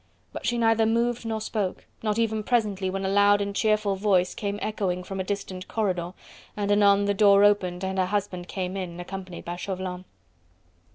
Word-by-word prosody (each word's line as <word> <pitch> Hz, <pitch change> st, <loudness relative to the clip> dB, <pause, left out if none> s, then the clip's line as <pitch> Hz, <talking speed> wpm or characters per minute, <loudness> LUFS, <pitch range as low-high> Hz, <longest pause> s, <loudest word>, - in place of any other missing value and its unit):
But -, -, -5 dB
she 240 Hz, -, +1 dB
neither 225 Hz, -1 st, +3 dB
moved 235 Hz, +1 st, 0 dB
nor 220 Hz, -1 st, -1 dB
spoke, 210 Hz, -3 st, -3 dB, 0.2 s
not 215 Hz, -1 st, -1 dB
even 220 Hz, -1 st, +1 dB
presently 210 Hz, -5 st, 0 dB
when 195 Hz, +1 st, -3 dB
a -, -, +1 dB
loud 205 Hz, +1 st, +4 dB
and 200 Hz, 0 st, -3 dB
cheerful 215 Hz, -2 st, +2 dB
voice 190 Hz, -2 st, +2 dB
came 200 Hz, -1 st, -3 dB
echoing 190 Hz, -5 st, -2 dB
from 195 Hz, +1 st, -6 dB
a -, -, 0 dB
distant 190 Hz, -1 st, -5 dB
corridor, 185 Hz, -5 st, -1 dB, 0.4 s
and 205 Hz, -1 st, 0 dB
anon 205 Hz, -1 st, +5 dB
the 200 Hz, -, +2 dB
door 200 Hz, 0 st, +5 dB
opened 190 Hz, -3 st, +2 dB
and 190 Hz, 0 st, -2 dB
her 185 Hz, -, +2 dB
husband 190 Hz, -3 st, -2 dB
came 185 Hz, -1 st, -4 dB
in, 180 Hz, -3 st, -5 dB
accompanied 185 Hz, 0 st, -7 dB
by 175 Hz, +1 st, -4 dB
Chauvelin. 185 Hz, -1 st, -5 dB
200 Hz, 185 wpm, -26 LUFS, 185-210 Hz, 0.4 s, anon